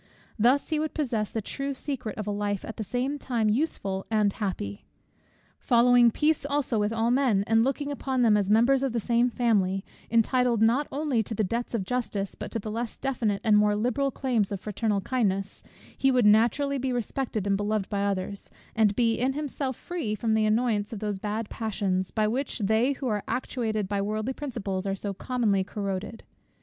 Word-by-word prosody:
Thus 250 +6 +3
he 310 -2 0
would 310 0 -3
possess 230 -9 -1
the 225 - -4
true 275 +5 -4
secret 255 -5 -4
of 215 - -4
a 210 - -2
life 205 -1 -2
at 225 - -7
the 220 - -2
same 255 +6 -2
time 230 -6 0
useful 205 -7 -1
and 210 -3 +2
happy. 140 - -4 0.7
Following 245 0 +5
peace 300 +6 +1
also 280 -5 0
with 210 +1 +1
all 225 +1 +1
men, 245 -7 +3
and 225 +1 +3
looking 285 +3 -1
upon 265 -2 -1
them 220 -3 +5
as 200 -2 +1
members 240 +5 +4
of 270 -3 -1
the 235 - +1
same 235 +2 +2
family, 200 -6 +1 0.2
entitled 235 +1 +2
not 235 +6 +3
only 280 -5 0
to 220 +1 -5
the 215 - +1
debts 235 +5 -2
of 210 - -1
justice, 205 -3 -2
but - - -7
to - - -3
the 215 0 -5
less 230 +1 -4
definite 230 -7 -1
and 215 -3 +5
more 210 0 +3
liberal 250 +6 0
claims 240 -7 0
of 200 - -3
fraternal 210 0 -1
kindness; 195 -4 -1 0.3
he 270 - +2
would 250 -3 +3
naturally 235 +7 +3
be 260 0 -1
respected 240 -3 -2
and 200 -1 +2
beloved 205 0 -1
by 200 -1 -1
others, 200 0 -3 0.3
and 215 -2 +3
be 230 -1 +2
in 260 +2 +1
himself 280 -2 -3
free 290 -11 -3
from 220 +1 0
the 220 0 +3
annoyance 215 -2 +1
of 225 - -5
those 205 -1 -3
bad 210 +2 -3
passions, 195 -5 -2
by 215 -1 +1
which 255 +5 -2
they 220 +6 +2
who 265 -1 -5
are 210 -3 0
actuated 220 -5 -2
by 200 0 -1
worldly 215 +5 -2
principles 205 -9 -4
are 195 - 0
so 200 0 -4
commonly 210 -3 0
corroded. 200 +2 -4
225 Hz, 195 wpm, -27 LUFS, 205-255 Hz, 0.7 s, Following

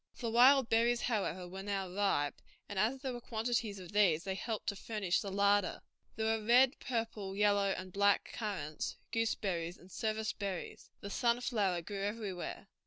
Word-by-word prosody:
The 235 -2 -3
wild 255 +2 +6
berries, 235 +1 +3
however, 185 -6 -1
were 190 +2 -7
now 195 -1 -2
ripe, 180 -6 0 0.3
and 205 -2 -3
as 240 +6 +1
there 265 -2 -3
were 240 - -6
quantities 225 -2 -1
of 185 -1 -9
these 190 -6 +3
they 195 - -2
helped 215 +3 -4
to 200 - -3
furnish 200 -3 -1
the 200 - -5
larder. 200 0 +2 0.3
There 220 - -1
were 220 -1 +1
red, 250 +4 +5
purple, 225 -5 -3
yellow, 205 -1 +3
and 185 -1 -7
black 200 0 +3
currants, 190 -9 -4
gooseberries, 190 -6 -1
and 185 - -17
service 220 +1 -1
berries. 195 -4 -5
The 200 - -6
sunflower 235 -8 +1
grew 200 +2 -5
everywhere. 200 -3 -4
205 Hz, 170 wpm, -34 LUFS, 190-225 Hz, 0.3 s, wild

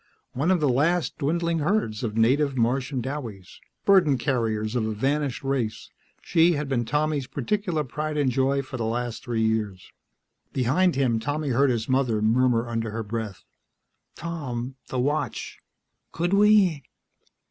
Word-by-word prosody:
One 145 +7 0
of 185 -2 +3
the 150 - +2
last 155 +7 +1
dwindling 170 +3 0
herds 150 - 0
of 110 -2 -3
native 135 +4 +3
Martian 125 +2 0
douwies, 115 -9 -6 0.3
burden 180 -9 +5
carriers 115 -3 -1
of 120 - +1
a 110 - -2
vanished 140 +3 -1
race, 130 -5 -2 0.3
she 170 +1 +4
had 150 -1 -2
been 125 -3 0
Tommy's 150 0 0
particular 160 - -1
pride 150 +3 -4
and 140 -3 +2
joy 135 +2 +1
for 130 0 -7
the 115 - -2
last 120 +1 -3
three 115 -3 -1
years. 110 -4 -2 0.6
Behind 145 +8 +2
him, 125 -4 +1
Tommy 145 +5 -2
heard 135 +2 +3
his 115 -3 -1
mother 130 -4 +1
murmur 120 +2 +2
under 115 -1 -2
her 110 +1 -4
breath, 105 -3 -5 0.7
"Tom... 135 -7 -4
the 130 - -4
watch; 145 +5 -2 0.5
could 175 +3 -1
we?" 200 -6 +5
130 Hz, 150 wpm, -25 LUFS, 115-150 Hz, 0.7 s, burden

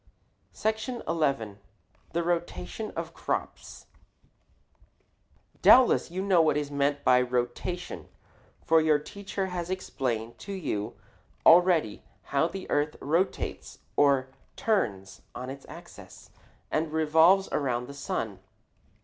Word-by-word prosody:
SECTION 220 +3 -2
XI. 135 -11 0 0.5
THE 170 +1 -1
ROTATION 175 +5 -3
OF - - -5
CROPS - - -4 1.8
Doubtless 255 -7 +6
you 185 +3 -3
know 190 -4 +4
what 155 -2 +2
is 145 -1 -3
meant 140 0 0
by 125 0 +5
rotation, 125 +8 -3 0.6
for 165 0 +5
your 155 -1 +4
teacher 195 +5 -5
has 175 -1 -3
explained 120 -11 -3
to 200 - -7
you 105 - -3 0.5
already 170 - +5 0.3
how 140 +3 +3
the 190 +1 -7
earth 145 +1 +1
rotates, 165 +7 -2 0.2
or 140 -2 +3 0.3
turns, 100 - -1
on 130 +1 -5
its 135 0 -10
axis - - -13 0.4
and 155 0 0
revolves 160 +5 +4
around 125 -4 -1
the 140 - -9
sun. 110 -8 -4
155 Hz, 115 wpm, -28 LUFS, 130-180 Hz, 1.8 s, Doubtless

